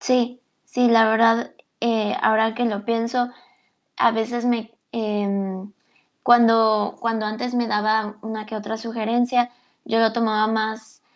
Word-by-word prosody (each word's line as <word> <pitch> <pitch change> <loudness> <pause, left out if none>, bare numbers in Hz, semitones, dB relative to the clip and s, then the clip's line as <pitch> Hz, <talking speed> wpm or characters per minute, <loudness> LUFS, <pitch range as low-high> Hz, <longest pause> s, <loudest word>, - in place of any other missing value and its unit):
Sí, 250 -1 0 0.2
sí, 250 -1 +1
la 225 -1 +5
verdad, 230 +1 +3 0.3
eh, 225 -3 0
ahora 220 0 +3
que 240 +1 -1
lo 210 -2 -3
pienso, 235 +2 -1 0.7
a - - +4
veces 235 +2 -2
me, 230 -2 -1 0.2
em, 200 -3 -3 0.5
cuando 225 -3 +4
cuando 225 -2 -1
antes, 220 +4 -4
me 240 -1 0
daba 215 0 0
una 220 -1 -6
que 220 - -8
otra 215 +1 -5
sugerencia, 240 +2 0 0.4
yo 225 +1 +1
lo 225 -1 +3
tomaba 215 -2 +1
más, 220 0 -4
225 Hz, 140 wpm, -22 LUFS, 215-235 Hz, 0.7 s, la